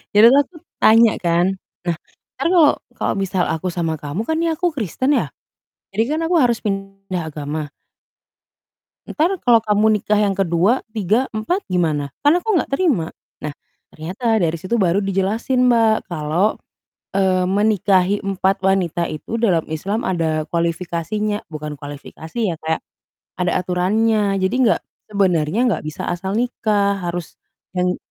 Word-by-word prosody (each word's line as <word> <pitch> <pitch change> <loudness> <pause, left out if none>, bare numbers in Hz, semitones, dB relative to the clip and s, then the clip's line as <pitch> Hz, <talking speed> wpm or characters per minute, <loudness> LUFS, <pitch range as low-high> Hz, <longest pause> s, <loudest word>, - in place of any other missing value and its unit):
jadilah 235 +7 +8
aku 330 +4 -17 0.2
tanya 225 0 +6
kan, 175 +2 +1 0.3
"Nah, 170 -2 0 0.4
ntar - - +1
kalau 315 -5 +6 0.2
kalau - - 0
misal 190 -2 0
aku 160 +3 -2
sama 165 -2 -1
kamu 150 +8 -4
kan 320 - 0
nih 335 -1 +1
aku 350 +1 0
Kristen 260 - -1
ya, - - 0 0.7
jadi 230 +9 +1
kan - - -2
aku 350 +1 +2
harus 240 -4 +2
pindah 195 -4 -4
agama" 150 0 -4 1.4
"entar 325 +5 +1
kalau 235 -2 +6
kamu 210 0 +2
nikah 210 +1 +1
yang 200 -2 +1
ke-2, 190 +6 +2
3, 220 +4 +1
4, 225 - -1
gimana? 155 -6 0
Kan 295 +4 +6
aku 435 +5 -1
enggak - - 0
terima." 275 - +1 0.3
Nah 150 -1 -4 0.4
ternyata 190 +9 -1
dari 170 -3 0
situ 185 +6 -1
baru 190 -1 +2
dijelasin, 210 +7 +1
Mbak, 225 -4 +3
kalau, 170 +5 0 0.6
eee, 185 -2 +2
menikahi 200 -1 +2
4 195 0 0
wanita 185 -3 +1
itu 190 +9 -5
dalam 175 -8 +3
Islam 200 +9 -2
ada 160 -4 0
kualifikasinya 170 +5 -2
bukan 150 -1 -6
kualifikasi 145 +5 -9 0.2
ya, - - -6
kayak 160 0 -1 0.5
ada 180 -1 0
aturannya, 200 +3 +1
jadi 190 +3 0
enggak 225 - +3 0.3
sebenarnya 180 -3 +1
enggak 220 - -1
bisa 155 -1 -5
asal 185 +2 -3
nikah, 210 -5 0
harus 175 -1 -4 0.4
yang 180 0 +1
195 Hz, 145 wpm, -20 LUFS, 170-220 Hz, 1.4 s, jadilah